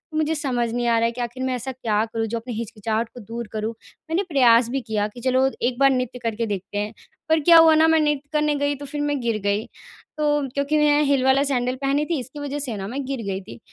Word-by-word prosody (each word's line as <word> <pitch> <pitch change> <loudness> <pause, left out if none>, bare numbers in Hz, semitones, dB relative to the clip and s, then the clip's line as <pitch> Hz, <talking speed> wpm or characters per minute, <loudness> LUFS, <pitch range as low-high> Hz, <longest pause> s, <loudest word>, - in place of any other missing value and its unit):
मुझे 315 +1 +1
समझ 250 -5 -1
नहीं 240 +1 -1
आ 230 - +3
रहा 230 - +2
है 230 - +1
कि 245 +1 -6
आख़िर 245 +2 -4
मैं 260 -1 0
ऐसा 250 +2 -4
क्या 225 -4 0
करूँ 225 0 -3
जो 230 +2 -3
अपनी 240 +1 -6
हिचकिचाहट 225 0 -3
को 245 - -10
दूर 230 +1 -7
करूँ। 215 +1 -2 0.4
मैंने 355 +5 +1
प्रयास 240 -4 +5
भी 270 +2 -2
किया 215 -3 -1
कि 240 +3 -12
चलो, 260 +1 +2
एक 245 +1 -1
बार 275 0 +6
नृत्य 255 -1 -2
करके 230 0 -1
देखते 200 0 -4
हैं, 210 +2 -2 0.4
पर 320 - +4
क्या 335 +3 +7
हुआ 325 -1 +7
ना, 320 +1 +5
मैं 320 0 +4
नृत्य 295 -1 0
करने 300 -1 +2
गई 285 0 0
तो 285 +1 -9
फिर 290 +1 -4
मैं 290 -1 0
गिर 230 -2 0
गई। 205 +2 0 0.5
तो 295 -2 +1
क्योंकि 280 +2 0
मैं 300 0 +4
हील 275 -2 +2
वाला 265 +1 +4
सैंडल 255 -2 0
पहनी 280 +2 +1
थी, 330 -2 -1
इसकी 260 +4 -8
वजह 290 0 -4
से 255 -6 -3
ना 195 0 -5
मैं 275 +5 -4
गिर 265 -2 -4
गई 195 0 -2
थी। 120 -11 -11
255 Hz, 260 wpm, -23 LUFS, 230-290 Hz, 0.5 s, क्या